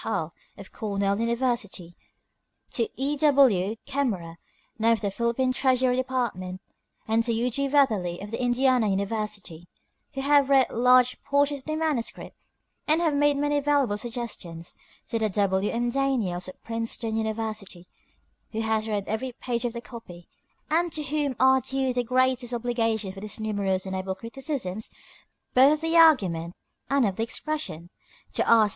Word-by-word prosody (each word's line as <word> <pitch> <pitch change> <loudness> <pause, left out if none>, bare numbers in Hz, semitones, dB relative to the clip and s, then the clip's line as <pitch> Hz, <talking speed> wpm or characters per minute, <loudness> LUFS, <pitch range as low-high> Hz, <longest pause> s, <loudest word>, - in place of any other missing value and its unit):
Hull, - - -2 0.2
of - - -11
Cornell 200 -2 -1
University; 230 -7 -1 0.8
to 230 -2 0
E. 280 +2 0
W. 265 -10 +4
Kemmerer, 210 -13 -2 0.4
now 230 +1 +4
of 225 - -2
the 200 -2 -1
Philippine 235 +4 0
Treasury 255 -1 +2
Department, 240 -8 -2 0.5
and 225 +1 +2
to 235 - 0
U. 235 +2 0
G. 275 +4 0
Weatherly, 215 -12 +2
of 205 +3 -8
Indiana 250 0 +2
University, 200 -4 -3 0.5
who 270 - -2
have 280 0 +4
read 270 -2 +4
large 250 +1 +4
portions 285 0 +1
of 260 - -17
the 310 - -1
manuscript, 310 -7 -2 0.5
and 310 +2 +4
have 325 -3 +1
made 290 0 +3
many 290 0 +1
valuable 280 -6 +2
suggestions; 210 -7 -5 0.3
to 230 - -1
W. 200 -2 +1
M. 240 +1 -1
Daniels, 235 -10 0
of 185 - -11
Princeton 230 0 -2
University, 220 -5 -4 0.7
who 220 - -1
has 220 0 0
read 205 -2 -2
every 220 +4 -2
page 240 0 -3
of 235 - -2
the 235 - -5
copy, 180 -9 -11 0.4
and 340 +2 +2
to 305 - -1
whom 290 -1 -1
are 265 0 +5
due 265 +1 -1
the 245 0 0
greatest 255 0 +1
obligations 225 -4 -1
for 195 - -10
his 215 +2 -3
numerous 200 -3 -1
and 190 0 -4
able 190 0 -3
criticisms 230 -2 -4 0.6
both 265 +3 +7
of 305 - -3
the 325 +1 0
argument 185 - +4 0.3
and 275 -3 +3
of 195 -3 -1
the - - -1
expression; 230 - -4 0.4
to - - +1
R. 225 -2 +6
235 Hz, 155 wpm, -26 LUFS, 205-265 Hz, 0.8 s, both